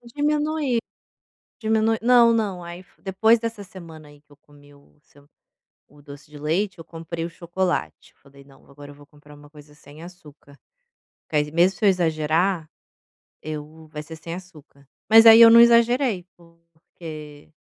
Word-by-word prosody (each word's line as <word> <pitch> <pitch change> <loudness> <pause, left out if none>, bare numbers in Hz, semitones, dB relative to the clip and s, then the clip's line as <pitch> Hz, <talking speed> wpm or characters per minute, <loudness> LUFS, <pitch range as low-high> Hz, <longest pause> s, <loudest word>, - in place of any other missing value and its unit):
Diminui, 295 -2 -1 0.8
diminu 220 0 0
Não, 240 -1 +4
não, 200 -6 -3
aí 170 +1 -10
fo - - -32
depois 220 +4 +2
dessa 230 -2 -6
semana, 165 -5 -13
aí, 145 0 -19
que 150 - -35
eu 145 - -20
comi 145 0 -22
o 140 0 -24
seu 145 -1 -25 0.6
o 145 - -21
doce 145 +1 -14
de 150 - -12
leite, 175 +6 -2
eu 165 - -11
comprei 165 0 -8
o 170 - -5
chocolate. 175 - -4
Eu - - -44
falei: 140 0 -19
"Não, 135 -1 -22
agora 145 +1 -14
eu - - -14
vou 145 0 -19
comprar 150 0 -19
uma 145 0 -17
coisa 150 -1 -17
sem 150 +1 -16
açúcar". 150 -5 -16 0.7
Que 155 - -4
aí 150 0 0
mesmo 175 +4 +1
se 215 - -4
eu - - +5
exagerar, 165 -1 -1 0.7
eu 155 +1 -9
vai 150 - -7
ser 160 +1 -11
sem 165 +1 -8
açúcar, 155 -6 -15 0.2
mas 225 +1 +7
aí 225 0 +8
eu 230 - +9
não 230 +1 +7
exagerei, 235 -4 +3
porque 165 -3 -14
165 Hz, 175 wpm, -22 LUFS, 150-205 Hz, 0.8 s, eu